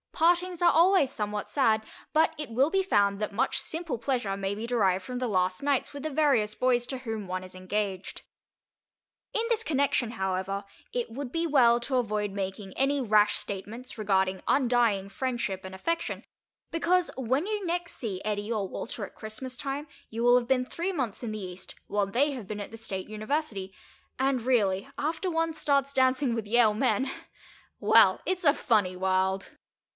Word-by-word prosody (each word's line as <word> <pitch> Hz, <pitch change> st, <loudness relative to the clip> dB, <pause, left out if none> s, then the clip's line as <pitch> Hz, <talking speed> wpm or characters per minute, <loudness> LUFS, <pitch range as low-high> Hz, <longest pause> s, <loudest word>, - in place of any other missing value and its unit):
Partings 350 Hz, +1 st, +2 dB
are 345 Hz, -, +6 dB
always 340 Hz, -4 st, +4 dB
somewhat 210 Hz, -3 st, -3 dB
sad, 220 Hz, -6 st, +2 dB, 0.3 s
but 320 Hz, +1 st, +4 dB
it 300 Hz, -3 st, -5 dB
will 265 Hz, +6 st, +3 dB
be 385 Hz, +2 st, +2 dB
found 200 Hz, -, +2 dB
that 210 Hz, -, -2 dB
much 245 Hz, +7 st, 0 dB
simple 325 Hz, -5 st, -4 dB
pleasure 235 Hz, -5 st, -1 dB
may 195 Hz, 0 st, -2 dB
be 220 Hz, +3 st, -5 dB
derived 195 Hz, -6 st, +2 dB
from 250 Hz, +5 st, -5 dB
the 250 Hz, 0 st, -1 dB
last 185 Hz, 0 st, 0 dB
nights 285 Hz, -1 st, +1 dB
with 285 Hz, -1 st, -7 dB
the 310 Hz, -, -1 dB
various 265 Hz, -8 st, +2 dB
boys 245 Hz, 0 st, +2 dB
to 265 Hz, -1 st, -4 dB
whom 220 Hz, -5 st, -5 dB
one 185 Hz, 0 st, -3 dB
is 185 Hz, 0 st, -10 dB
engaged. 190 Hz, 0 st, -3 dB, 1.1 s
In 450 Hz, -, +1 dB
this 455 Hz, -1 st, +1 dB
connection, 275 Hz, -, +1 dB
however, 190 Hz, -1 st, -2 dB, 0.3 s
it 245 Hz, -1 st, -1 dB
would 260 Hz, +1 st, -5 dB
be 335 Hz, +2 st, 0 dB
well 240 Hz, -6 st, +5 dB
to 260 Hz, +2 st, -1 dB
avoid 210 Hz, -4 st, 0 dB
making 195 Hz, 0 st, -5 dB
any 275 Hz, +1 st, +2 dB
rash 210 Hz, -3 st, +4 dB
statements 215 Hz, +6 st, -6 dB
regarding 190 Hz, -3 st, +1 dB
undying 235 Hz, -7 st, +2 dB
friendship 235 Hz, -5 st, -2 dB
and 190 Hz, 0 st, -8 dB
affection, 335 Hz, -, -2 dB, 0.5 s
because, 345 Hz, +2 st, +2 dB
when 265 Hz, -, 0 dB
you 420 Hz, -1 st, -2 dB
next 345 Hz, 0 st, -2 dB
see 200 Hz, -6 st, -4 dB
Eddie 205 Hz, +1 st, -2 dB
or 210 Hz, -4 st, -1 dB
Walter, 215 Hz, +2 st, -5 dB
at -, -, -15 dB
Christmas 230 Hz, +4 st, -7 dB
time, 280 Hz, +2 st, -4 dB, 0.2 s
you 230 Hz, +1 st, -3 dB
will 245 Hz, +1 st, +6 dB
have 240 Hz, -1 st, -1 dB
been 255 Hz, -1 st, +2 dB
three 345 Hz, +8 st, -3 dB
months 255 Hz, -, -3 dB
in 230 Hz, -, -3 dB
the 215 Hz, -2 st, -5 dB
East, 180 Hz, 0 st, -8 dB
while 205 Hz, -1 st, +1 dB
they 265 Hz, +9 st, +2 dB
have 245 Hz, -8 st, -7 dB
been 210 Hz, 0 st, -5 dB
at 205 Hz, -, -5 dB
the 225 Hz, -, -8 dB
State 195 Hz, -4 st, -5 dB
University, 215 Hz, -3 st, -3 dB, 0.5 s
and 265 Hz, -2 st, +1 dB
really, 205 Hz, -5 st, +2 dB
after 325 Hz, +5 st, -1 dB
one 325 Hz, 0 st, 0 dB
starts 280 Hz, -3 st, +1 dB
dancing 260 Hz, -1 st, +2 dB
with 225 Hz, -2 st, -3 dB
Yale 220 Hz, -1 st, +4 dB
men—well, 265 Hz, +3 st, +1 dB
it's 370 Hz, 0 st, -1 dB
a 285 Hz, -, +7 dB
funny 205 Hz, -9 st, +1 dB
world. 190 Hz, +1 st, 0 dB
235 Hz, 180 wpm, -28 LUFS, 200-280 Hz, 1.1 s, a